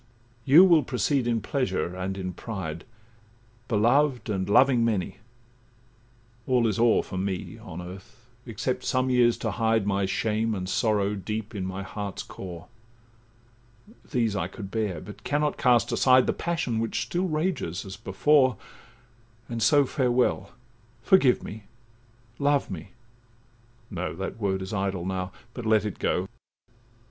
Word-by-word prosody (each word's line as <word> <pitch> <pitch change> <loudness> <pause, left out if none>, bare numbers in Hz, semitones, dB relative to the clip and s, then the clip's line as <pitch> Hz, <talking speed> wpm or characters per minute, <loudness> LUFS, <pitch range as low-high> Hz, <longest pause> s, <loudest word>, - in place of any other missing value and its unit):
'You 160 +8 +8
will 170 -4 +6
proceed 130 0 0
in 115 -2 +1
pleasure, 125 -7 -2
and 95 +1 -4
in 90 -1 -4
pride, 85 -7 -6 0.8
Beloved 120 +3 +2
and 95 -1 -2
loving 125 +2 +5
many; 110 -6 -1 1.3
all 125 -2 +3
is 110 -2 0
o'er 115 -1 +4
For 95 - -5
me 95 -1 -4
on 90 +3 -8
earth, 95 +7 -12 0.2
except 125 +3 -3
some 130 0 +1
years 120 -2 +4
to - - -2
hide 115 -3 +1
My 100 -1 0
shame 110 +2 0
and 90 -1 -4
sorrow 105 0 +1
deep 105 +3 -5
in 95 -3 -3
my 95 +1 -5
heart's 100 -1 -5
core; 90 -3 -9 1.4
These 115 -6 0
I 90 -3 -1
could 100 +1 -9
bear, 105 -8 -2
but 105 -1 -11
cannot 150 0 0
cast 120 -4 +3
aside 130 -1 +5
The - - +1
passion 165 -10 -2
which 115 +2 -1
still 175 +9 -1
rages 155 - -2
as 95 0 -7
before— 130 +6 +2 0.9
And 115 -1 -4
so 145 +5 +5
farewell—forgive 125 - 0
me, 105 0 -8 0.7
love 145 -4 +1
me—No, 120 0 -10
That 95 +4 -5
word 95 -2 0
is 95 - -7
idle 95 -3 -2
now—but 95 +6 -6
let 110 -1 +3
it 105 - -5
go. 90 +2 0
115 Hz, 135 wpm, -26 LUFS, 95-125 Hz, 1.4 s, You